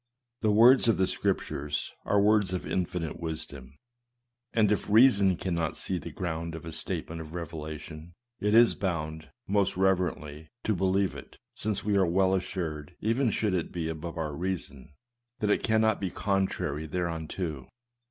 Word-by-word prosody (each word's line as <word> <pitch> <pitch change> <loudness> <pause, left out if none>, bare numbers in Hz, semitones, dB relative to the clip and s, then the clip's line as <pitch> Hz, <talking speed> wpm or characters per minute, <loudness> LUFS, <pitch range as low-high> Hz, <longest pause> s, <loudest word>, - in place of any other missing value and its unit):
The 110 - +1
words 120 +5 +6
of 115 - +4
the 95 - +3
Scriptures 75 -4 -2
are 100 - +3
words 105 -2 +3
of 90 - -3
infinite 90 -3 -2
wisdom, 70 -5 -6 0.7
and 105 -3 +3
if 105 - 0
reason 105 -4 +6
cannot 85 -3 -2
see 90 -2 -2
the - - -7
ground 85 -2 -4
of 80 - -8
a 80 - -6
statement 80 +1 -4
of 80 +1 -9
revelation, 80 0 -7 0.2
it 105 +1 +2
is 120 0 +7
bound, 80 -4 -3 0.2
most 100 -2 +1
reverently, 80 -5 0
to 110 - +1
believe 95 +1 +1
it, - - -11 0.2
since 105 -2 -2
we 105 -1 +1
are 95 -2 +4
well 95 +2 +3
assured, 85 -4 -3
even 115 +4 +1
should 105 -2 0
it 90 -3 -1
be 85 -2 -3
above 80 +1 -6
our 75 -2 -2
reason, 75 -6 -4 0.4
that 105 -1 0
it - - +2
cannot 110 -1 +2
be 95 - -1
contrary 95 -6 -1
thereunto. 80 -3 -3
90 Hz, 160 wpm, -28 LUFS, 80-100 Hz, 0.7 s, is